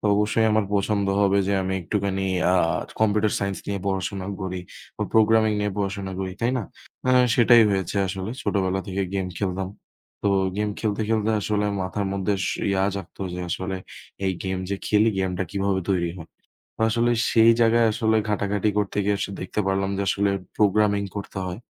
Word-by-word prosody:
তো - - -15
অবশ্যই 105 +2 +2
আমার 110 -1 +3
পছন্দ 100 0 +1
হবে 100 0 +3
যে - - +2
আমি 95 0 -2
একটুখানি 95 +1 -1 0.3
আ - - +4 0.5
কম্পিউটার 105 -1 +2
সাইন্স 100 -1 -2
নিয়ে 100 -2 -2
পড়াশোনা 95 0 -2 0.2
করি 95 -1 -3 0.4
বা - - -2
প্রোগ্রামিং 110 0 +4
নিয়ে 105 -1 -1
পড়াশোনা 100 -1 -3
করি, 95 -1 -3
তাই 120 +1 +2
না? - - -2 0.5
আ - - +5 0.2
সেটাই 120 -1 +7
হয়েছে 95 0 -1
আসলে। 95 +2 -4
ছোটবেলা 95 -1 0
থেকে 95 0 -2
গেম 95 -1 -1
খেলতাম। 95 -1 -2 0.5
তো 100 - +2 0.3
গেম 105 0 0
খেলতে, 110 0 -1
খেলতে 110 -1 +1
আসলে 105 0 0 0.2
মাথার 95 +2 -2
মধ্যে 100 0 -1 0.3
ইয়া 95 -1 +2
জাগতো 95 0 -7
যে 90 - -4
আসলে 95 +2 -3 0.5
এই 95 - +1
গেম 95 -1 -2
যে 100 - +1
খেলি, 105 +1 +4
গেমটা 95 -1 -1
কিভাবে 100 -1 0
তৈরি 85 -3 +1
হয়? 85 -1 -10 0.5
তো - - -15
আসলে 120 +2 +2 0.2
সেই 115 0 +6
জায়গায় 115 0 +4
আসলে 110 +1 +1
ঘাটাঘাটি 105 0 0
করতে 100 -1 -1
গিয়ে 100 0 +2
আস 100 - -1 0.2
দেখতে 95 +3 -2
পারলাম 95 0 0
যে 100 - -1
আসলে 100 +1 +2 0.3
প্রোগ্রামিং 105 -1 +3
করতে 100 -1 -5
হয়। 90 +2 -5
100 Hz, 175 wpm, -24 LUFS, 95-105 Hz, 0.5 s, সেটাই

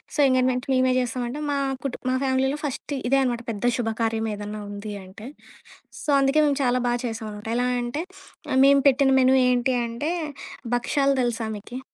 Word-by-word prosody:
So, - - -4
engagement 255 0 +1
మేమే 255 0 +3
చేస్తామంటే 250 +3 -3
మా 280 - 0 0.3
కుటు 275 -3 -4
మా 255 - +1
ఫ్యామిలీలో 265 +2 +1
ఫస్ట్ 290 0 -4 0.2
ఇదే 275 +1 +4
అనమాట 240 -2 -1
పెద్ద 225 +3 0
శుభకార్యం 225 -1 -1
ఏదైనా 210 +1 -6
ఉంది 205 +1 -6
అంటే. 200 +5 -11 0.8
సో, - - -5
అందుకే 275 +3 +3
మేము 285 -2 +1
చాలా 250 0 +2
బా 240 - +2
చేశాం 225 -1 -4
అనమాట. 210 +1 -8
ఎలా 245 0 +1 0.2
అంటే 245 +7 -3 0.5
ఆహ్, 260 - +3
మేము 280 0 +6
పెట్టిన 270 0 +2
మెనూ 260 +1 +5
ఏంటి 250 +1 +1
అంటే 235 +8 -3 0.6
భక్షాలు 275 +3 +1
తెలుసా 235 -2 -2
మీకి? 240 +5 -8
250 Hz, 170 wpm, -24 LUFS, 230-270 Hz, 0.8 s, మేము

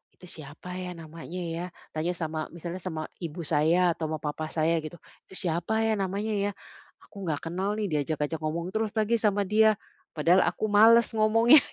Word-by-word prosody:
"Itu - - -25
siapa 155 +1 -9
ya, 180 -1 -5
namanya 165 +1 -9
ya?" 165 +1 -3 0.3
Tanya 165 +3 -1
sama 155 -2 -3
misalnya 170 +2 -5
sama 160 -4 -5
ibu 170 -1 -5
saya 165 +4 +3
atau 160 -1 -3
sama 155 0 -2
papah 155 +1 -3
saya 165 +1 +1
gitu. 155 +2 -7 0.3
"Itu 190 - -10
siapa 180 +5 0
ya, 225 0 +2
namanya 200 +3 -1 0.2
ya, - - -1 0.5
aku 200 -3 -9
enggak 150 -3 -2
kenal 195 +4 -1
nih, 210 -1 -1
diajak-ajak 150 +1 -1
ngomong 170 +3 -3
terus 220 +1 -2
lagi 225 +1 +2
sama 205 -2 +2
dia. 215 +2 +4 0.4
Padahal 170 +4 +4
aku 180 +5 -1
males 225 +3 +6
ngomongnya", 225 +6 +6
175 Hz, 180 wpm, -28 LUFS, 160-210 Hz, 0.5 s, males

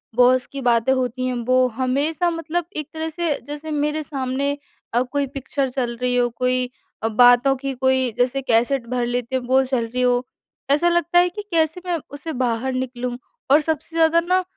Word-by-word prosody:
Boss 250 +1 +4
की 275 - -7
बातें 240 0 +2
होती 255 0 -1
हैं 255 - -1
वो 255 +1 +4
हमेशा 285 +7 0
मतलब 330 +1 -2
एक 305 -2 -3
तरह 320 0 -3
से 335 -1 -1
जैसे 295 +2 -6
मेरे 300 +1 -1
सामने 275 0 -2 0.4
अ, 240 - +3
कोई 275 +2 -1
पिक्चर 275 0 -3
चल 250 -2 -2
रही 250 0 +1
हो, 245 -1 +2
कोई 250 +1 0 0.3
अ, - - +2
बातों 245 +4 +5
की 270 +1 -4
कोई 260 -1 +1
जैसे 250 +2 +1
कैसेट 240 0 +1
भर 250 -1 0
लेते 245 +1 -2
हैं 260 - 0
वो 260 +1 +4
चल 255 -3 -1
रही 250 +2 -3
हो। 250 0 +2 0.5
ऐसा 330 +5 +4
लगता 345 0 +3
है 355 0 +4
कि 385 +4 -7
कैसे 325 +1 +1
मैं 350 -2 0 0.2
उसे 305 +3 -5
बाहर 240 +2 -1
निकलूँ 250 -1 -3 0.3
और 290 - +7
सबसे 315 +1 -3
ज़्यादा 330 +1 +4
न 370 0 +4
265 Hz, 195 wpm, -22 LUFS, 250-305 Hz, 0.5 s, और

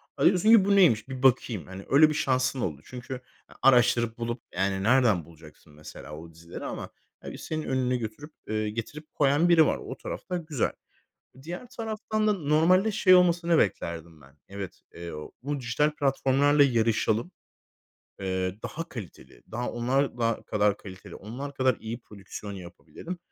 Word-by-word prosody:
Ha, - - 0
diyorsun 185 +3 +4
ki: 225 -4 +7
"Bu 200 0 +3
neymiş 135 - +4
bir 130 0 -6
bakayım." 120 -7 +2
Hani, 95 +1 -9
öyle 150 +3 +6
bir - - -1
şansın 130 -3 0
oldu 75 -8 -3
çünkü, 125 +1 -8 0.4
ya, - - -17
araştırıp 120 -3 +4
bulup, 120 +1 -4
yani, 95 0 0
nereden 110 - +3
bulacaksın 80 -2 -17
mesela 75 0 -10
o 80 +1 -11
dizileri 85 +1 -9
ama, - - -5 0.3
ya, - - -6
bir - - -8
senin 155 -1 -4
önüne 130 -2 0
götürüp 120 +7 -7 0.2
eee, 110 0 -1
getirip 145 +8 -7
koyan 145 +4 +3
biri 165 -2 +6
var. - - +1
O - - -8
tarafta 180 - -5
güzel. 155 -7 -1 0.7
Diğer 175 - -7
taraftan 215 -1 -2
da 210 - +4
normalde 175 +5 +3
şey 190 -3 +5
olmasını 170 -2 +3
beklerdim 80 - -2
ben. 70 +1 -20
"Evet, 100 -1 -8
eee, 85 0 -7
o 75 0 -8
bu 145 +1 -2
dijital 135 +5 +1
platformlarla 145 0 +3
yarışalım, 115 +2 +1 0.9
eee, 95 -1 -2
daha 165 +1 -5
kaliteli, 100 - -10
daha 120 +2 -2
onlar 125 +2 0
da 115 -1 0
kadar 105 -1 +2
kaliteli, 95 -2 -11
onlar 135 +7 -7
kadar 130 -2 +2
iyi 115 +2 -6
prodüksiyon 100 -1 -9
yapabilelim. 95 - -9
125 Hz, 165 wpm, -27 LUFS, 100-150 Hz, 0.9 s, ki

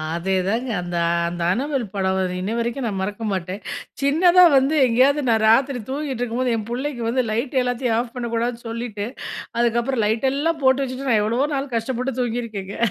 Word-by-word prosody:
அதே 190 +3 -1
தாங்க. 240 +5 -1
அந்த, 175 -1 -4 0.3
அந்த 175 0 -6
"அனபெல்" 270 0 -1
படம் 190 -1 0
வந்து 185 -1 -1
இன்னிவரைக்கும் 235 +5 -2
நான் 195 -3 -3
மறக்க 205 +3 -4
மாட்டேன். 185 +2 -4 0.4
சின்னதா 345 +6 +5
வந்து, 270 +4 +2
எங்கேயாவது 265 +5 +3
நான் 220 -1 +3
ராத்திரி 260 +2 +3
தூங்கிட்ருக்கும் 255 -4 -2
போது 250 -2 +1
என் 220 0 -5
புள்ளைக்கு 250 0 -3
வந்து, 255 +2 +1
லைட் 250 +4 0
எல்லாத்தயும் 245 -1 0
ஆஃப் 240 -1 -4
பண்ணக் 235 -1 -4
கூடாதுன்னு 235 +1 -2
சொல்லிட்டு, 225 -3 -4 0.5
அதுக்கு 235 0 +2
அப்புறம் 240 -3 -1
லைட் 225 +5 +1
எல்லாம் 310 +3 -1
போட்டு 265 +1 +4
வச்சிட்டு, 265 +1 -4
நான் 220 -3 +4
எவ்வளவோ 240 +7 +1
நாள் 270 -2 -3
கஷ்டப்பட்டு 250 +2 -2
தூங்கிருக்கேங்க. 225 -5 -4
240 Hz, 175 wpm, -22 LUFS, 220-265 Hz, 0.5 s, சின்னதா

